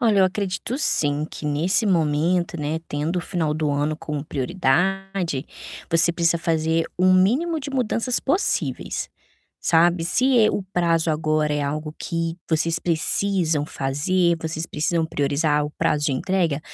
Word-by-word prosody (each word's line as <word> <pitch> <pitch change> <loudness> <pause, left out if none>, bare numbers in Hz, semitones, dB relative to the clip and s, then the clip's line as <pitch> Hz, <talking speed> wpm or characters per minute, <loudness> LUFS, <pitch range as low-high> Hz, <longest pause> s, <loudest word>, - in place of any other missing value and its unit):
Olha, 220 -4 +3
eu - - +6
acredito 195 +6 -2
sim, 145 - +2
que - - -9
nesse 155 +9 +1
momento, 170 -1 +1
né, 150 +1 -2
tendo 150 +4 -2
o - - +1
final 170 -4 -2
do 155 0 -1
ano 145 +2 0
como 150 -2 -5
prioridade, 175 +2 -1 0.5
você 170 0 +4
precisa 170 0 +1
fazer 165 -1 0
um 185 +1 +4
mínimo 255 - +2
de 285 - -6
mudanças 250 -2 0
possíveis, 360 +9 -1 0.5
sabe, 170 0 +3
se, 250 +9 +2
eh, 215 - +4
o 200 - -2
prazo 165 -2 +2
agora 155 -1 0
é 150 - -1
algo 150 +2 -3
que 165 -1 -3
vocês 165 +1 +1
precisam 165 -2 0
fazer, 170 +7 0
vocês 160 0 -3
precisam 165 +1 0
priorizar 150 0 0
o 150 - -4
prazo 150 0 +1
de 145 - +1
entrega, 170 -1 0
165 Hz, 150 wpm, -23 LUFS, 150-185 Hz, 0.5 s, eu